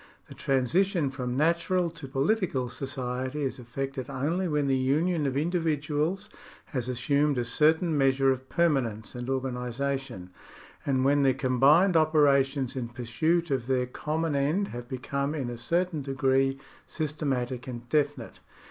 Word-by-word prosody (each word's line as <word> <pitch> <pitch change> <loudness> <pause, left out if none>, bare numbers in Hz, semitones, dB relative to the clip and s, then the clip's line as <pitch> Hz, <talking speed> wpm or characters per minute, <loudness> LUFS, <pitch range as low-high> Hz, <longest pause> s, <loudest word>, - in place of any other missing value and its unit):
The - - -9
transition 145 - +1
from 125 -2 -3
natural 170 +3 +1
to 160 -4 -9
political 135 - 0
society 130 +1 -3
is 130 -1 -3
effected 130 +2 -5
only 155 +8 -1
when 150 -3 0
the 135 -1 +2
union 150 +5 +1
of 135 - -2
indivi 160 0 0
duals 155 +8 -1 0.5
has 125 -2 -2
assumed 140 +3 +1
a 120 - 0
certain 160 +6 +2
measure 135 -1 +3
of 130 0 -4
permanence 130 -11 0
and 125 0 -6
organisation, 130 -4 -3 0.6
and 130 -1 +2
when 145 +1 +4
their 135 -2 +3
combined 140 +8 +4
operations 140 -4 +3
in 125 -3 -3
pursuit 145 +8 0
of 130 -3 -1
their 130 -1 +1
common 155 +4 -2
end 155 +9 +1
have 120 0 -8
become 140 +3 -2
in 130 -5 -3
a - - -5
certain 170 +6 0
degree 135 0 +1 0.3
sys 155 -2 -3
tematic 130 -4 -2
and 120 -1 -7
definite. 145 -5 -1
135 Hz, 150 wpm, -28 LUFS, 130-155 Hz, 0.6 s, when